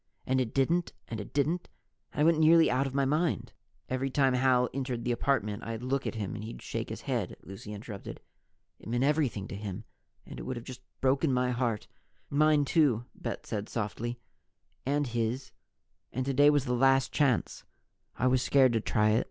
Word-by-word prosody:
And 130 0 +2
it 115 -3 -2
didn't, 165 +6 +1 0.2
and 115 - -4
it 100 - -10
didn't 155 +5 0 0.4
and - - -2
I - - +5
went 165 0 +4
nearly 160 +1 +6
out 130 +2 +1
of 135 - -6
my 140 -1 +3
mind 155 +5 0 0.2
" - - -42
"Every 130 +1 -1
time 135 -1 +3
Hal 125 -1 +3
entered 130 -3 -3
the 125 - 0
apartment, 115 -4 0
I'd 115 +1 -5
look 135 +2 -1
at - - -3
him 105 -4 -3
and 110 -1 -6
he'd 110 - -7
shake - - -4
his - - -6
head," - - -2
Lucy 95 +2 -9
interrupted. 105 -1 -7 0.6
"It - - -10
meant 120 +2 +1
everything 140 -9 +1
to - - -5
him. 100 0 -5 0.4
And - - -9
it - - -5
would 130 -1 -4
just 130 -2 -8
have - - -42
broken 135 +3 +2
my 125 0 +1
heart 120 -4 -1 0.3
" - - -39
"Mine, 150 0 +4
too," 135 -7 +3
Bet 115 - -5
said 105 -1 -4
softly. 115 +2 -3 0.7
"And 145 +1 +1
his. 120 +2 -2 0.6
And 130 +1 -2
today 140 +2 +5
was 145 -2 +2
the 125 - 0
last 135 +1 +3
chance. 135 -6 +1 0.5
I 125 - 0
was 130 0 +3
scared 130 -2 +4
to 115 - +1
try 105 0 +2
it. 110 - +4
130 Hz, 200 wpm, -30 LUFS, 115-140 Hz, 0.7 s, nearly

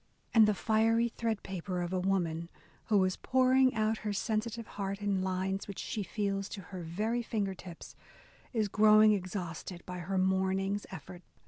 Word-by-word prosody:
And 220 -2 +7
the 210 - +2
"fiery 225 +3 +2
threadpaper" 195 -6 -3
of 175 - -5
a 185 - +1
woman 170 -3 0 0.4
who 205 -3 +3
is 185 0 0
pouring 260 0 +3
out 220 0 +1
her 210 -1 -3
sensitive 220 +2 -2
heart 200 -1 -4
in 200 -2 0
lines 190 +1 -2
which 200 - -7
she 215 - -3
feels 195 -1 -2
to 200 - -6
her 185 - -4
very 210 +9 -1
finger 210 -4 -2
tips, 180 -2 -11 0.6
is 220 -4 +1
grow 215 +1 +6
ing 215 - +7
exhausted 180 -2 -5
by 180 0 -6
her 190 +3 -2
morning's 190 +1 +1
effort. 180 0 -9
195 Hz, 165 wpm, -32 LUFS, 185-215 Hz, 0.6 s, And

